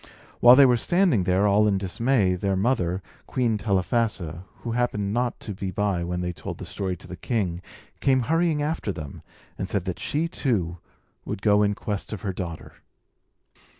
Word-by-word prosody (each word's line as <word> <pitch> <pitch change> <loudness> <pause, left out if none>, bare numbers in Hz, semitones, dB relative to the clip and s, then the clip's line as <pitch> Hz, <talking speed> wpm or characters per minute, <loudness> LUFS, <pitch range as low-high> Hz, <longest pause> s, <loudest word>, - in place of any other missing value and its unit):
While 120 +1 +9
they 140 +1 +8
were 125 -2 +4
standing 175 - +2
there, 95 +3 +3
all 105 +1 +4
in 100 -2 +2
dismay, 100 +1 +1
their 95 +2 0
mother, 95 -4 0 0.2
Queen 115 -4 0
Telephassa 95 - -1 0.2
(who 115 - -4
happened 105 -4 0
not 120 +1 -1
to 105 - -5
be 95 0 -4
by 95 -2 0
when 90 +1 -2
they 90 0 -2
told - - -7
the - - -7
story 95 +1 -3
to - - -14
the - - -7
king), 95 -7 -2 0.4
came 130 -1 +3
hurrying 160 +2 +1
after 150 -8 -2
them, 75 -6 -8 0.4
and 95 - -3
said 100 -4 -1
that 90 -2 -4
she, 155 +3 -1
too, 95 - -1 0.4
would 95 - -5
go 105 -1 +4
in 105 0 +2
quest 105 0 -4
of 105 - -7
her 95 -3 -2
daughter. 85 -3 -6
100 Hz, 185 wpm, -25 LUFS, 90-120 Hz, 0.4 s, While